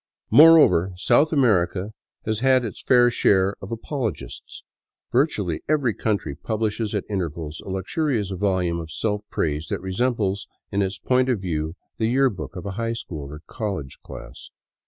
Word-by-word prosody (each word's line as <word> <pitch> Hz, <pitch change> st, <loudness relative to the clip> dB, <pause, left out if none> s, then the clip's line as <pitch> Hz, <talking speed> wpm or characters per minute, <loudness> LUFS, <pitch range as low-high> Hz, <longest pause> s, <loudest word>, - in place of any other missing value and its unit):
Moreover, 150 Hz, -, +7 dB
South 120 Hz, -, +3 dB
America 105 Hz, -, +2 dB, 0.3 s
has 110 Hz, -1 st, -1 dB
had 130 Hz, 0 st, +3 dB
its 110 Hz, -, -7 dB
fair 120 Hz, -1 st, +4 dB
share 95 Hz, -3 st, +3 dB
of 95 Hz, -, -8 dB
apologists. 115 Hz, -, -5 dB, 0.5 s
Virtually 110 Hz, -, 0 dB
every 140 Hz, -7 st, +2 dB
country 105 Hz, -10 st, -2 dB
publishes 110 Hz, +5 st, -2 dB
at 100 Hz, -, -1 dB
intervals 80 Hz, -5 st, -4 dB
a -, -, -9 dB
luxurious 105 Hz, -, -1 dB
volume 95 Hz, -3 st, 0 dB
of 80 Hz, -1 st, -7 dB
self 105 Hz, +4 st, -2 dB
praise 75 Hz, 0 st, -2 dB
that -, -, -3 dB
resembles 100 Hz, 0 st, -1 dB, 0.2 s
in 100 Hz, -, 0 dB
its 95 Hz, 0 st, -1 dB
point 130 Hz, 0 st, +1 dB
of 120 Hz, -5 st, +1 dB
view 80 Hz, -3 st, -3 dB, 0.2 s
the 110 Hz, -, +2 dB
year 135 Hz, +1 st, +3 dB
book 100 Hz, 0 st, -8 dB
of 90 Hz, -, -7 dB
a 100 Hz, -, -3 dB
high 115 Hz, 0 st, -1 dB
school 75 Hz, -11 st, -7 dB
or 75 Hz, +1 st, -10 dB
college 95 Hz, -, -5 dB
class. -, -, -11 dB
100 Hz, 155 wpm, -23 LUFS, 90-120 Hz, 0.5 s, Moreover